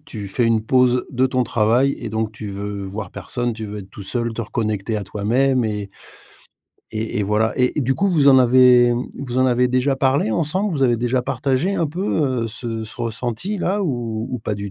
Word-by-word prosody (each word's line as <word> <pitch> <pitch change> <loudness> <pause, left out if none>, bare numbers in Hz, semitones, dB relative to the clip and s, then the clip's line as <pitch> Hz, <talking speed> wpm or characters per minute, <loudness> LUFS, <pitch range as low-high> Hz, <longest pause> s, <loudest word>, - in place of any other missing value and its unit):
tu 105 -7 -7
fais 120 +5 0
une 115 -1 +2
pause 125 +1 +3
de 130 0 +2
ton 130 -1 0
travail 120 +5 +2
et 115 - -4
donc 110 0 -2
tu 105 -1 -7
veux 100 0 -5
voir 100 0 -6
personne, 120 -1 -3
tu 110 0 -6
veux 105 0 -6
être 95 -1 -10
tout 100 - -10
seul, 115 +3 -2
te 115 +1 -4
reconnecter 110 -1 -2
à 105 - -4
toi-même 120 +6 +1
et 105 -2 -3 1.0
et 110 +1 -3
et - - +1
voilà. 105 +2 +1
Et 125 +4 +1
du 135 +1 +1
coup, 200 +6 +1
vous 150 -6 +4
en 130 - +8
avez 125 -1 +6 0.3
vous 130 -2 -3
en 130 - +4
avez 125 0 +2
déjà 130 +2 +1
parlé 135 -4 +1
ensemble? 180 - 0
Vous 140 - -1
avez 120 -3 +3
déjà 120 +2 0
partagé 135 +8 -1
un 165 - +1
peu, 145 - -1
heu, - - -2
ce 115 0 -5
ce 110 - -12
ressenti 120 - -3
là 195 +3 0
ou 120 - -2
ou 125 - -3
pas 105 -1 -3
du 100 0 -6
120 Hz, 215 wpm, -21 LUFS, 110-130 Hz, 1.0 s, en